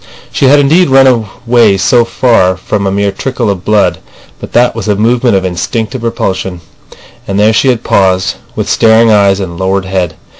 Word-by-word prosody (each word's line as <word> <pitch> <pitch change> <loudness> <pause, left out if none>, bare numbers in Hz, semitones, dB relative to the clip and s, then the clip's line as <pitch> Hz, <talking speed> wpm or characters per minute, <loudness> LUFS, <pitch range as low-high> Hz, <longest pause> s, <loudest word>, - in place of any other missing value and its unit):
She - - 0
had 145 +2 +5
indeed 155 +4 +2
run 135 0 +4 0.4
away 115 -4 +3
so 115 +6 +2
far 115 -7 +1
from 100 +1 -3
a - - -1
mere 100 0 -1
trickle 125 0 -3
of 95 -2 -6
blood, 105 0 +1 0.4
but - - -9
that 125 +1 +2
was 115 -3 -5
a 105 - +1
movement 115 +2 +1
of 95 -1 -1
instinctive 110 +8 -4
repulsion. 95 -5 -3 0.7
And 100 0 -2
there 105 +2 +3
she 125 - +1
had 120 -3 0
paused, 95 -2 0 0.2
with - - -3
staring 115 0 +3
eyes 100 -2 +2
and 85 -3 -6
lowered 95 +1 -1
head. 90 -4 -3
105 Hz, 185 wpm, -10 LUFS, 95-120 Hz, 0.7 s, had